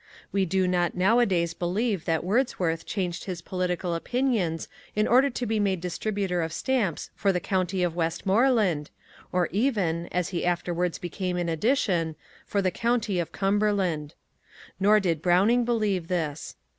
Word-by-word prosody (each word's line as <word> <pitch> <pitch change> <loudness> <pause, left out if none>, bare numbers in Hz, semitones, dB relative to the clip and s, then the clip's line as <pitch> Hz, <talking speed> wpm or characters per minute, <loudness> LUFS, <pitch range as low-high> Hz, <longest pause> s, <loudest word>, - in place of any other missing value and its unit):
We 195 -1 +1
do 190 +1 +1
not 175 -1 +1
nowadays 185 -4 +3
believe 190 +2 -1
that 165 -1 0
Wordsworth 180 -6 0
changed 180 -3 -3
his 180 -3 -5
political 180 -1 -2
opinions 200 -4 0 0.3
in 215 +1 +2
order 260 +4 +5
to 245 -1 -3
be 220 -1 0
made 195 -3 +1
distributor 185 0 -2
of 160 0 -2
stamps 210 - -1
for 195 +1 +2
the 180 - 0
county 185 0 -1
of 170 -2 -1
Westmoreland, 190 - +1 0.4
or 180 -2 +1
even 190 -6 0
(as 180 -1 -1
he 175 -3 -2
afterwards 175 0 0
became 180 +1 -3
in 175 -1 -1
addition) 170 - +1 0.3
for 200 -1 0
the 185 - +2
county 230 -3 0
of 170 - -3
Cumberland. 195 -6 0 0.6
Nor 210 +2 +5
did 170 -6 0
Browning 200 +8 +3
believe 210 -7 0
this. 160 -4 -3
185 Hz, 150 wpm, -26 LUFS, 170-210 Hz, 0.6 s, order